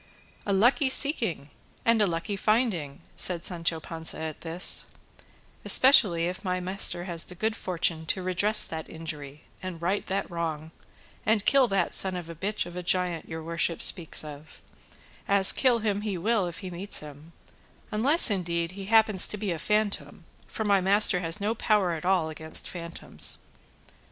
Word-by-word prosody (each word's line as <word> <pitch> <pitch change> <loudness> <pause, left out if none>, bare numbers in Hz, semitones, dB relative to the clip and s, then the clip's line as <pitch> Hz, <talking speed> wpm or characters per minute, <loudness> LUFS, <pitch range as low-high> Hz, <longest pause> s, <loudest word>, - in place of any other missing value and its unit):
"A - - 0
lucky 245 +7 +2
seeking 230 - +2 0.3
and 230 -1 +3
a 205 - +3
lucky 170 +4 -4
finding!" 200 - -1
said 175 -1 0
Sancho 170 -2 0
Panza 160 +1 -3
at 160 -1 -7
this; 170 +2 +1 0.8
"especially 210 -11 +6
if 180 +3 -5
my 185 -1 -2
master 180 -1 -1
has 170 -2 -2
the 180 - -9
good 220 +4 -2
fortune 170 -5 -2
to 185 +3 -1
redress 200 +4 +4
that 160 -1 -7
injury, 155 -3 -8 0.2
and 185 -3 -7
right 185 +4 -2
that 195 +1 -3
wrong, 160 -2 -5 0.5
and 215 -1 0
kill 275 -2 +4
that 195 -4 -1
son 190 -1 +2
of 170 -2 -7
a - - -7
bitch 200 +5 -3
of 175 0 -11
a 180 - -5
giant 180 -2 -2
your 160 0 -7
worship 170 0 -1
speaks 170 -5 +1
of; 150 +1 -12 0.7
as 200 -1 +5
kill 255 -3 +2
him 210 -2 -2
he 205 -3 -4
will 205 +1 0
if 170 - -8
he 185 - -6
meets 185 +4 -3
him, 150 +2 -13 0.6
unless, 255 +6 +6
indeed, 170 -3 -2
he 195 +1 -9
happens 215 -2 +5
to 210 - -4
be 205 -2 -3
a 165 - -4
phantom; 210 +3 -2 0.2
for 220 - -5
my 200 -2 +2
master 195 0 +3
has 165 +1 0
no 210 +2 -1
power 210 -5 0
at 165 0 -6
all 180 -4 +1
against 160 0 -4
phantoms. 170 -1 -5
180 Hz, 170 wpm, -26 LUFS, 165-210 Hz, 0.8 s, especially